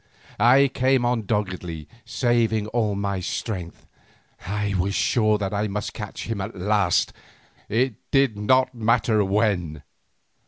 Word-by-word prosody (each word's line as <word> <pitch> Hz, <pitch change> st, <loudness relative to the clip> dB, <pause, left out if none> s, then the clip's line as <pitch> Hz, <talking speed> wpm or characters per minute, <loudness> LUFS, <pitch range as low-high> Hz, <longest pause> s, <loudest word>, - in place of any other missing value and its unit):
I 135 Hz, +4 st, +6 dB
came 130 Hz, -1 st, +1 dB
on 120 Hz, -4 st, 0 dB
doggedly, 90 Hz, -7 st, -3 dB, 0.2 s
saving 115 Hz, -4 st, +1 dB
my 100 Hz, -4 st, 0 dB
strength. 90 Hz, -1 st, -5 dB, 0.6 s
I 105 Hz, 0 st, -1 dB
was 100 Hz, +3 st, 0 dB
sure 110 Hz, -3 st, +2 dB
that 100 Hz, -1 st, -3 dB
I 105 Hz, +1 st, 0 dB
must 105 Hz, +1 st, -4 dB
catch 105 Hz, -3 st, -7 dB
him 115 Hz, -3 st, -3 dB
at 100 Hz, +4 st, -6 dB
last, 100 Hz, -1 st, +1 dB, 0.6 s
it 125 Hz, +3 st, +1 dB, 0.2 s
did 135 Hz, -5 st, +3 dB
not 130 Hz, +5 st, +2 dB
matter 115 Hz, -2 st, +2 dB
when. 95 Hz, -7 st, 0 dB
105 Hz, 125 wpm, -24 LUFS, 100-120 Hz, 0.6 s, I